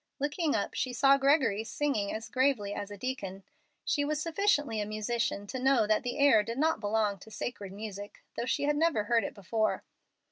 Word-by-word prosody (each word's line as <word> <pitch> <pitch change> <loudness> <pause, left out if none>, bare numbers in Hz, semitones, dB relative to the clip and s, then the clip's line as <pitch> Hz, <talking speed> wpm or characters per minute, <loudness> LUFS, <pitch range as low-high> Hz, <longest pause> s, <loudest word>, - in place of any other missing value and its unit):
Looking 300 +2 0
up 200 - -1
she 255 - -2
saw 275 +2 +5
Gregory 270 -7 +3
singing 225 -4 -1
as 225 +1 -5
gravely 230 -3 +1
as 205 - -5
a 205 - -8
deacon. 195 -5 -5 0.4
She 290 - +1
was 300 +1 -1
sufficiently 310 - +1
a - - -2
musician 215 -1 -2
to 260 +6 -5
know 260 -3 +3
that 215 0 +2
the 245 +1 -4
air 280 -7 +6
did 230 +3 -5
not 320 0 +2
belong 210 -1 0
to 220 - -13
sacred 210 -3 -5
music, 205 0 -8
though - - -2
she - - 0
had 295 +1 +2
never 310 -9 +2
heard 230 +1 +2
it - - -5
before. 215 +3 -1
230 Hz, 200 wpm, -30 LUFS, 210-280 Hz, 0.4 s, air